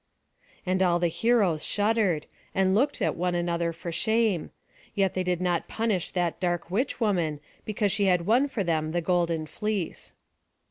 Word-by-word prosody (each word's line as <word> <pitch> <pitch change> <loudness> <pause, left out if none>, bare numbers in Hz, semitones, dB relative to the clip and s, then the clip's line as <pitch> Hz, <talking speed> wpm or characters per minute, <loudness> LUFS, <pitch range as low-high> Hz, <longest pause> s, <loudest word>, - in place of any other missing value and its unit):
And 185 0 +1
all 175 -2 +4
the 175 0 +1
heroes 185 -3 +2
shuddered, 205 -6 +1 0.3
and 190 0 +3
looked 270 +8 +2
one 180 0 0
at 175 0 0
the 175 - -1
other 170 0 0
for 165 +1 -6
shame; 220 -2 +1 0.5
yet 195 -3 +2
they 185 - -1
did 180 -1 0
not 175 -2 0
punish 220 -6 -1
that 175 -2 -1
dark 175 -1 -1
witch 245 +8 -1
woman, 175 - 0 0.3
because 210 -1 0
she 205 0 +1
had 180 -3 +2
won 245 +8 +3
for 245 -7 -2
them 160 -2 -1
the 175 - +1
golden 170 -2 0
fleece. 205 +1 -4
180 Hz, 175 wpm, -27 LUFS, 170-210 Hz, 0.5 s, all